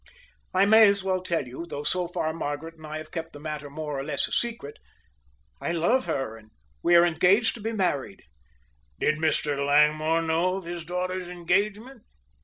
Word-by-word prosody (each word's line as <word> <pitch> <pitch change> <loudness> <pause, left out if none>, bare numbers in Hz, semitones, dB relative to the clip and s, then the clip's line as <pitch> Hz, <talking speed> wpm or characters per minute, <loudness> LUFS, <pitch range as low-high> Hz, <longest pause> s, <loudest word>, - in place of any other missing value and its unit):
I 190 +1 +4
may 220 +1 +7
as 200 -1 +1
well 185 -1 0
tell 170 -6 -1
you, 130 +8 -8
though 145 -3 -5
so 180 +3 0
far 160 -2 -2
Margaret 160 +1 -4
and 155 -1 -12
I 155 0 -5
have 155 0 -9
kept 165 -1 -5
the 145 - -10
matter 150 -1 -6
more 150 -1 -5
or - - -3
less 145 -1 0
a - - -12
secret. 230 -12 -2 0.8
I - - -1
love 225 +11 +1
her 135 -5 -2
and 110 -1 -18 0.3
we 175 - +4
are 170 0 +7
engaged 185 +7 +3
to 230 - -10
be 225 +2 -2
married." 185 -10 -2 0.8
"Did 150 - +1
Mr. 150 -2 0
Langmore 155 +3 +3
know 165 +3 +1
of 195 - -5
his 170 -1 -6
daughter's 180 +1 -3
engagement?" 205 +8 -1
165 Hz, 190 wpm, -26 LUFS, 150-185 Hz, 0.8 s, may